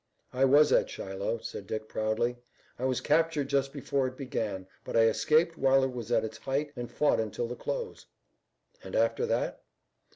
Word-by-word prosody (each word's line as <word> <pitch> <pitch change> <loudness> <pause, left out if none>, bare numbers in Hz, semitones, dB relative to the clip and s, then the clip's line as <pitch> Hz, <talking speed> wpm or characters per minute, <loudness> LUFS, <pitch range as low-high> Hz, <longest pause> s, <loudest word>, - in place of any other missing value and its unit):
"I 130 +1 +3
was 145 +3 +6
at - - +3
Shiloh," 95 +4 -3
said 100 - -7
Dick 110 0 -4
proudly. 110 +3 -1 0.4
"I 130 - -1
was 130 -1 0
captured 155 -2 +2
just 135 -1 +1
before 140 -1 -1
it 130 0 -8
began, 105 -8 -3 0.2
but - - -2
I - - +7
escaped 155 +10 +3
while 135 0 +4
it 130 - 0
was 120 -2 -6
at 115 -2 +3
its 110 - -7
height 140 +2 -2
and 120 -2 -5
fought 150 - +2
until 110 +2 -2
the 125 - -5
close." 480 - -5 0.8
"And - - -7
after 470 -1 +2
that?" - - -1
130 Hz, 185 wpm, -29 LUFS, 115-145 Hz, 0.8 s, I